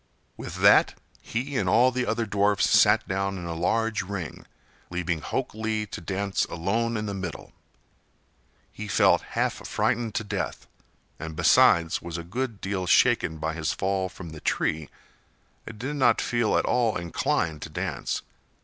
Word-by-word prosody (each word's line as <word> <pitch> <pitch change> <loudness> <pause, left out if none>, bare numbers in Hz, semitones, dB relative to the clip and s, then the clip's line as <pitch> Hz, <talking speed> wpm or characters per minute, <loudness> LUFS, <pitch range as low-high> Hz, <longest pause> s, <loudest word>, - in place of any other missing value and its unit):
With - - -7
that, - - +6 0.3
he 130 +4 -3
and 95 -4 +1
all 120 +7 +5
the 125 0 -2
other 115 +1 0
dwarfs 100 -1 +2
sat 105 +1 +4
down 95 +1 -1
in 90 - -6
a 85 - -4
large 110 +6 0
ring, 95 -7 -6 0.4
leaving 90 -2 -2
Hok - - -3
Lee 110 0 -2
to 100 - -8
dance 100 +2 -1
alone 115 +7 -1
in 105 - -3
the 100 - -3
middle. 95 -4 -6 1.2
He 105 - -7
felt - - +4 0.2
half - - +2
frightened 115 -2 0
to 110 - 0
death, 100 - -4 0.5
and 80 0 -6
besides 80 +1 +4
was 85 -1 -5
a 85 - -5
good 115 +4 -4
deal 95 -2 -2
shaken 80 -2 +3
by 80 +1 -2
his 80 -1 -1
fall 95 -1 -1
from 90 -3 -10
the 80 -1 -10
tree 80 -2 -1 0.8
and 110 - -8
did 135 +6 -4
not 130 - +4
feel 120 -3 +1
at - - +1
all 120 -4 +1
inclined 85 -2 -1
to - - -6
dance. - - -3
100 Hz, 165 wpm, -26 LUFS, 85-110 Hz, 1.2 s, that